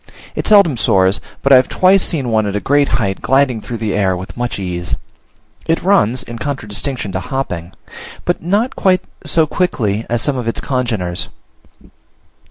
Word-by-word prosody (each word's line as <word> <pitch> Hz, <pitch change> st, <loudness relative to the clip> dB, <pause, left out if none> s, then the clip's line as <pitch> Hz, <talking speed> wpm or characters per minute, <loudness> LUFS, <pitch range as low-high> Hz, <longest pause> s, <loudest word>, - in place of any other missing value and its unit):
It -, -, -3 dB
seldom 200 Hz, -, +5 dB
soars; 95 Hz, -2 st, +2 dB, 0.2 s
but 140 Hz, -, +5 dB
I -, -, +10 dB
have 130 Hz, -, +2 dB
twice 190 Hz, +1 st, +4 dB
seen 140 Hz, -7 st, +1 dB
one 110 Hz, -1 st, +2 dB
at 100 Hz, -, -3 dB
a -, -, +1 dB
great 145 Hz, +5 st, +2 dB
height 100 Hz, -5 st, -2 dB
gliding 135 Hz, -4 st, +2 dB
through 120 Hz, 0 st, -5 dB
the 110 Hz, -3 st, -2 dB
air 95 Hz, -2 st, +1 dB
with 95 Hz, +2 st, -8 dB
much 120 Hz, 0 st, -3 dB
ease. 90 Hz, -2 st, -3 dB, 0.7 s
It 165 Hz, -, +1 dB
runs 130 Hz, -, +2 dB
(in 115 Hz, -1 st, -8 dB
contradistinction 120 Hz, -3 st, -3 dB
to 95 Hz, -, -2 dB
hopping), 90 Hz, -8 st, -4 dB, 0.5 s
but 175 Hz, -, 0 dB
not 205 Hz, +9 st, 0 dB
quite 185 Hz, -2 st, +2 dB, 0.2 s
so 160 Hz, -2 st, +3 dB
quickly 115 Hz, -, -1 dB
as 120 Hz, -1 st, 0 dB
some 145 Hz, -3 st, 0 dB
of 120 Hz, -2 st, -4 dB
its 115 Hz, -, -1 dB
congeners. 110 Hz, -10 st, -2 dB
120 Hz, 175 wpm, -17 LUFS, 100-145 Hz, 0.7 s, I